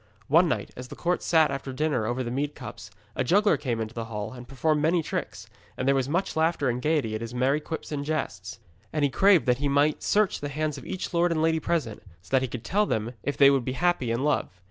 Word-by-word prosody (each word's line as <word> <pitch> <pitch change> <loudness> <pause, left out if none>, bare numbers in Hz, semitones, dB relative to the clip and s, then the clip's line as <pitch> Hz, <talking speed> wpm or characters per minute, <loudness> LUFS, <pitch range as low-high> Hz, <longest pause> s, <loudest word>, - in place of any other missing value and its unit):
One 165 +5 +5
night, 105 -5 -2
as 125 0 -8
the - - -9
court 175 +1 -1
sat 160 -3 +3
after 135 -1 -4
dinner 130 -5 0
over 120 +2 -1
the 120 - -4
mead 145 +3 -2
cups, 120 -6 -9 0.3
a - - 0
juggler 205 - +4
came 125 -6 -2
into 110 -1 -4
the 115 -1 -4
hall 110 0 -5
and 125 -1 -10
performed 150 +3 0
many 165 +2 +2
tricks, - - -4 0.3
and 130 - -2
there 140 - +5
was 135 -1 0
much 185 +5 -1
laughter 160 -4 +1
and 120 +1 -2
gaiety 150 -6 0
at 110 - -3
his 115 +1 -6
merry 135 +4 +2
quips 160 +1 -6
and 145 -2 -2
jests. 110 - -3 0.3
And 150 -2 -1
he 140 - +2
craved 195 +1 +5
that 125 -1 +2
he 145 - 0
might 145 +2 +2
search 210 -1 +2
the 145 - -4
hands 150 0 -2
of - - -12
each 185 - -4
lord 170 0 +3
and 165 - 0
lady 160 0 +2
present, 150 -9 -2 0.2
so - - -19
that 130 -1 +4
he 130 - -1
could 120 -1 -7
tell 205 +9 +1
them 110 +3 -2
if 145 +5 -3
they 140 -1 +7
would 135 -3 +2
be 130 - -3
happy 175 -5 +1
in 115 +3 -1
love. 150 0 +1
140 Hz, 255 wpm, -26 LUFS, 125-160 Hz, 0.3 s, they